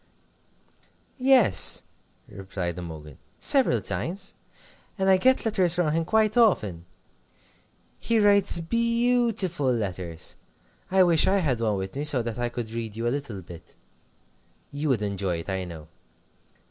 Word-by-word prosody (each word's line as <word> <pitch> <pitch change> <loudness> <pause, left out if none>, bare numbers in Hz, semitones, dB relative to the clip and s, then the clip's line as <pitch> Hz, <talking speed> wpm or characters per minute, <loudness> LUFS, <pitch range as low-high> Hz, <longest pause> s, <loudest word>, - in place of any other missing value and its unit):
"Yes," 255 - +4 0.4
replied 95 -3 -6
Imogen, 80 -4 -10 0.2
"several 275 -3 +2
times. 195 +4 -3 0.6
And 190 -1 -1
I 190 - +5
get 260 +6 +3
letters 185 -6 +1
from 175 -4 0
him 165 0 -1
quite 215 +2 +1
often. 105 - +1 1.1
He 230 0 0
writes 200 -3 +4
_beau_tiful 230 - 0
letters. 90 -6 -5 0.5
I 190 0 +4
wish 170 -3 +4
I 195 - +3
had 135 -11 -1
one 110 -3 0
with 95 +3 -6
me, 140 - -3
so 135 -5 +3
that 115 0 -5
I 120 0 -1
could 120 -2 -6
read 115 -2 -5
you 115 +1 -3
a 120 - 0
little 120 -10 -7
bit. 85 -1 -14 1.0
You 145 +1 -3
would 115 -6 0
enjoy 100 -3 -2
it, 85 - -10
I 95 -1 -3
know. 80 -3 -10
140 Hz, 140 wpm, -25 LUFS, -, 1.1 s, I